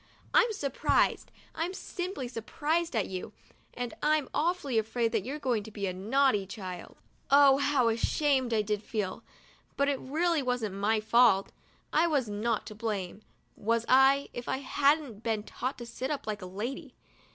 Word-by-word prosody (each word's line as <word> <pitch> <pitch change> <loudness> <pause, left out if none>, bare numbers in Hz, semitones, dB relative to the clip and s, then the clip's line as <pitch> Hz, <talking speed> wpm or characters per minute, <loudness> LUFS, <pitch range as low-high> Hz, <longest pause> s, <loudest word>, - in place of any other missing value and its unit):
I'm 470 - +5
surprised, 280 - +1 0.2
I'm 345 +4 -3
simply 355 -10 -5
surprised 295 +7 -2
at 220 - +1
you, 185 -1 -6 0.4
and 245 -2 -4
I'm 305 -2 +2
awfully 300 -8 +1
afraid 225 +1 -1
that 225 -4 0
you're 270 +7 -4
going 250 -7 0
to 215 - -10
be 205 -2 -4
a 185 - -2
naughty 215 +1 +2
child! 185 -4 -8 0.2
' - - -39
Oh, 280 -1 +7
how 280 -4 +2
ashamed 260 +3 +1
I 220 -2 +2
did 210 0 -1
feel; 210 -3 -3 0.6
but 280 - +2
it 275 -2 0
really 325 +3 0
wasn't 245 -6 -1
my 210 +2 +1
fault. 220 -3 +4 0.4
I 330 +3 +4
was 285 -7 +1
not 215 +1 -1
to 215 - -8
blame, 210 -3 -4 0.3
was 230 +2 0
I, 270 +2 +5
if 245 - -6
I - - 0
hadn't 280 -4 +1
been 225 -3 -1
taught 255 +4 -4
to 240 - -7
sit 255 +3 -5
up 295 -2 -3
like 215 -1 -4
a 185 - -6
lady? 245 - -6
245 Hz, 175 wpm, -29 LUFS, 215-280 Hz, 0.6 s, Oh